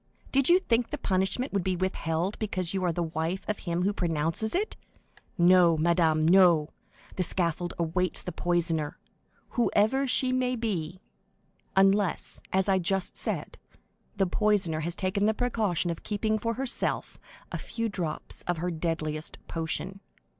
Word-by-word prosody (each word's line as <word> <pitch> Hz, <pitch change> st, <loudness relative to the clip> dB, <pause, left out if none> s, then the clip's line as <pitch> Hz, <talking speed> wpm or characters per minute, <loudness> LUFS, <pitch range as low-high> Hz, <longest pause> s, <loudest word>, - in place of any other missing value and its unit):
Did 270 Hz, +2 st, +3 dB
you 350 Hz, -, +7 dB
think 240 Hz, -10 st, 0 dB
the 300 Hz, -, -4 dB
punishment 195 Hz, +4 st, -1 dB
would 200 Hz, -2 st, 0 dB
be 185 Hz, 0 st, 0 dB
withheld 180 Hz, 0 st, -2 dB
because 185 Hz, -5 st, -2 dB
you 190 Hz, -1 st, -1 dB
are 180 Hz, -, +2 dB
the 170 Hz, +1 st, -1 dB
wife 165 Hz, +3 st, -3 dB
of 210 Hz, -, -2 dB
him 170 Hz, 0 st, -2 dB
who 200 Hz, +2 st, +1 dB
pronounces 165 Hz, -, -1 dB
it?—No, 180 Hz, -, +1 dB
madame, 160 Hz, -1 st, +2 dB
no; 170 Hz, -4 st, +5 dB, 0.5 s
the -, -, +1 dB
scaffold 175 Hz, -1 st, -1 dB
awaits 175 Hz, +2 st, +1 dB
the 180 Hz, -, -4 dB
poisoner, 170 Hz, -4 st, -1 dB, 0.5 s
whoever 240 Hz, +3 st, +2 dB
she 255 Hz, 0 st, +2 dB
may 255 Hz, 0 st, +1 dB
be, 185 Hz, -7 st, -3 dB, 0.8 s
unless, 195 Hz, -1 st, +3 dB
as 190 Hz, +1 st, +1 dB
I 190 Hz, -1 st, +3 dB
just 190 Hz, +1 st, 0 dB
said, -, -, -3 dB, 0.6 s
the 195 Hz, -2 st, +2 dB
poisoner 190 Hz, -4 st, +2 dB
has 170 Hz, +2 st, -1 dB
taken 200 Hz, +3 st, 0 dB
the 220 Hz, -, +2 dB
precaution 210 Hz, -8 st, 0 dB
of 165 Hz, -, -6 dB
keeping 215 Hz, +1 st, -1 dB
for 230 Hz, +2 st, -2 dB
herself 265 Hz, -1 st, -2 dB, 0.3 s
a -, -, -3 dB
few 230 Hz, -1 st, -3 dB
drops 180 Hz, -7 st, -4 dB
of 175 Hz, -1 st, 0 dB
her 175 Hz, +2 st, -2 dB
deadliest 160 Hz, -2 st, -3 dB
poison." 165 Hz, +4 st, -3 dB
185 Hz, 150 wpm, -28 LUFS, 170-210 Hz, 0.8 s, you